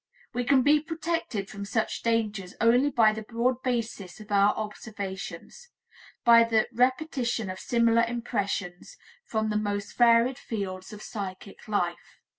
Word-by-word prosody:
We 245 0 -1
can 260 0 +4
be 295 +2 +5
protected 325 - -3
from 200 -1 -7
such 215 +2 -2
dangers 215 -5 -1
only 245 +5 +4
by 225 -5 +4
the 220 - -5
broad 235 +3 -1
basis 225 -7 -3
of 215 -1 -12
our 200 0 +5
observations, 215 - -7 0.6
by 230 0 +8
the 225 -1 +2
repetition 245 -4 0
of 185 - -8
similar 230 -1 +3
impressions 210 - -3 0.3
from 220 -1 -1
the 210 - +1
most 205 -1 -3
varied 240 +1 +4
fields 190 -4 -5
of 210 0 -9
psychic 195 -2 -7
life. 175 -5 -2
225 Hz, 140 wpm, -27 LUFS, 205-245 Hz, 0.6 s, by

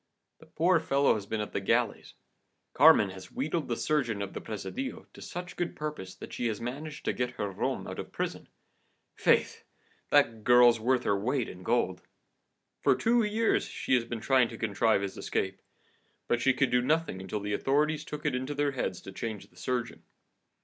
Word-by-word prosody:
The - - -17
poor 170 +1 +3
fellow 140 -3 +3
has 100 -2 -4
been 110 0 -2
at 105 - -6
the - - 0
galleys. - - 0 0.6
Carmen 100 -2 +6
has 95 -1 -11
wheedled 155 +4 -2
the 120 - -2
surgeon 125 -9 0
of 100 - -7
the - - -5
presidio 250 - -5
to - - -13
such 180 0 -7
good 175 -1 -3
purpose 150 -12 -5
that - - -10
she 120 - -1
has 110 -2 -2
managed 145 +6 -6
to - - +1
get 125 0 -1
her 100 -4 -3
rom 95 - -2
out - - -6
of - - -6
prison. - - -4 0.6
Faith! - - +2 0.5
that 110 -1 +3
girl's 120 -1 +6
worth 125 +2 +1
her 100 - +2
weight 120 +5 0
in 90 - -10
gold. 95 -3 0 0.8
For - - +4
two 235 +1 +3
years 220 +1 +1
she - - -3
has 125 -2 +4
been 115 -1 -5
trying 130 0 +4
to 115 - -8
contrive 110 -1 +2
his 100 - -5
escape, 95 0 -2 0.7
but 120 - +1
she 135 -1 +3
could 130 -1 +2
do 125 0 +4
nothing 150 - 0
until 95 +3 -4
the 105 0 -3
authorities 150 +6 +1
took 150 -1 -7
it 150 - +1
into 130 +3 -3
their 145 0 +1
heads 95 -9 -3
to 95 - -9
change 110 +1 -6
the - - -26
surgeon. 120 +6 -3
125 Hz, 195 wpm, -29 LUFS, 105-150 Hz, 0.8 s, Carmen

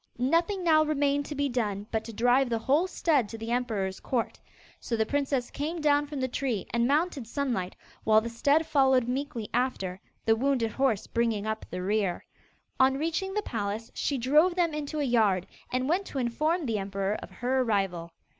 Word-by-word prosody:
Nothing 335 +9 +1
now 310 -2 +5
remained 285 -2 +1
to 295 - -5
be 285 0 +1
done 210 -6 -2
but 220 -1 -1
to 230 - -6
drive 245 +4 +3
the 230 - +1
whole 280 +10 +2
stud 295 - +1
to 225 - -7
the 225 +1 -5
emperor's 215 -6 -1
court. 245 -3 -2 0.4
So 235 - -2
the 220 - +2
princess 275 -2 -1
came 315 +4 -3
down 295 -1 +3
from 290 -1 -5
the 260 - +1
tree 245 -5 -2
and 235 0 +2
mounted 290 -3 0
Sunlight, 235 -8 -2 0.3
while 215 0 +5
the 225 - -5
stud 285 +7 +2
followed 265 -5 +3
meekly 250 -4 -3
after, 210 -7 -1 0.2
the 225 - +4
wounded 245 -2 +1
horse 255 -4 +1
bringing 230 -3 0
up 220 0 -3
the 180 - -4
rear. 195 -2 0 0.5
On 265 0 +4
reaching 335 +6 -2
the 425 - 0
palace, 215 - -4
she 280 - -1
drove 300 +8 +4
them 345 -3 +1
into 300 0 -3
a - - +1
yard, 215 -8 +2 0.3
and 255 +1 0
went 365 +6 0
to - - -6
inform 305 +7 0
the 225 -4 -1
emperor 195 0 -2
of - - -9
her 255 +2 -1
arrival. 195 -7 -1
250 Hz, 190 wpm, -28 LUFS, 220-290 Hz, 0.5 s, now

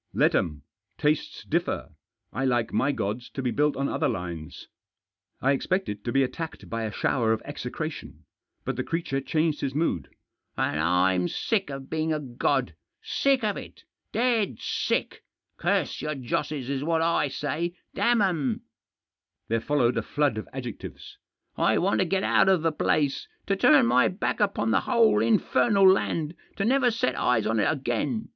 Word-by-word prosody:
" - - -44
Let - - +4
'em. 75 -3 -1 0.3
Tastes 150 0 0
differ. - - -2 0.4
I 135 - -2
like 120 -3 +1
my 140 - +2
gods 115 0 -3
to 135 - -3
be 125 - 0
built 150 +1 +1
on 140 +1 0
other - - 0
lines." 85 -4 -6 0.7
I 135 - +3
expected 140 - -1
to 120 - -2
be 135 +1 +3
attacked 160 +5 -5
by 115 -1 -3
a 110 - -3
shower 110 +1 +1
of 110 - -4
execra - - -4
tion. - - -11 0.4
But - - -2
the - - -1
creature 165 -5 -2
changed 155 +1 0
his 135 -1 -2
mood. 150 - 0 0.5
"And 75 - 0
I'm 90 +2 +2
sick 200 - -1
of 135 -1 -6
being 160 0 -1
a 155 - 0
god 125 -4 -1 0.2
— - - -57 0.2
sick 275 -3 +4
of 210 -2 0
it - - -10
— - - -56
dead 225 - +1
sick! - - -2 0.3
Curse - - 0
your 150 0 -2
josses, 135 +1 -3
is 140 0 -2
what 165 +1 +1
I 165 -3 +2
say 155 +5 -3
— - - -52
damn 235 -3 +3
'em! 150 - 0 0.4
" - - -61
There 115 0 +1
followed 125 -3 +1
a - - +2
flood 145 +1 0
of - - -9
adjectives. 125 -5 -8 0.2
" - - -51
I - - +2
want 195 +3 +1
to 185 - +3
get 190 +2 0
out - - +4
of 185 -4 +3
the 165 - +2
place, 145 -2 0 0.2
to 195 - +1
turn 195 - +5
my 125 +2 +4
back 185 - -2
upon 200 - +1
the - - +4
whole 225 - +3
infernal 195 - +3
land, 165 -4 +2 0.2
to 200 - -1
never 255 +1 +3
set 225 - 0
eyes 115 -3 +1
on 115 0 +1
it - - +3
again. 145 - -2
140 Hz, 185 wpm, -26 LUFS, 120-175 Hz, 0.7 s, turn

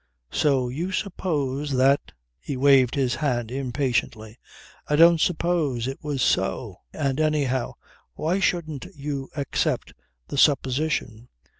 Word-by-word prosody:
So 135 -4 +2
you 160 +10 -3
suppose 150 -8 -2
that... 135 +2 +2 0.2
" - - -51
He 135 - -5
waved 135 -2 +4
his 130 -3 +1
hand 120 -6 -1
impatiently. 125 -4 -2 0.5
"I 150 - +1
don't 165 +1 +6
suppose. 155 -8 0
It 135 +4 -5
was 145 -4 -1
so. 65 - 0
And 140 0 -2
anyhow 145 -5 0 0.4
why 175 +5 0
shouldn't 170 -5 -1
you 140 -2 -5
accept 140 -3 -1 0.3
the 140 - -2
supposition. 130 -4 +1
140 Hz, 125 wpm, -24 LUFS, 130-155 Hz, 0.5 s, don't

